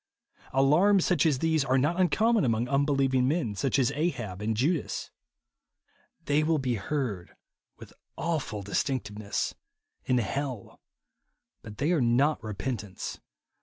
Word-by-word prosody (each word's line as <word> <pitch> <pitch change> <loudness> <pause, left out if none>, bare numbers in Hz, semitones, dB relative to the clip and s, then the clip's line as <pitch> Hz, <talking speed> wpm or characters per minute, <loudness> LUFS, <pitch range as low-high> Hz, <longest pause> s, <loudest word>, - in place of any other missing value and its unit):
Alarms, 170 +9 +4
such 170 -3 +3
as 145 -4 +2
these, 160 +1 +1
are 130 0 +2
not 160 +7 +1
uncommon 220 +4 +3
among 115 0 +1
unbelieving 135 -2 +2
men, 145 -7 0
such 125 +7 0
as 130 -1 +2
Ahab 120 - -3
and 110 +1 -1
Judas. 150 +6 -1 1.1
They 145 +1 +2
will 160 +1 +2
be 130 -3 -1
heard 110 -4 -3 0.4
with - - -13 0.2
awful 155 -11 -2
distinctness 105 -1 -2 0.5
in 125 - +2
hell; 125 0 -3 0.8
but 105 -1 -11
they 150 +5 +1
are 165 -6 +2
not 125 +6 +2
repentance. 105 -1 -5
135 Hz, 130 wpm, -28 LUFS, 115-155 Hz, 1.1 s, Alarms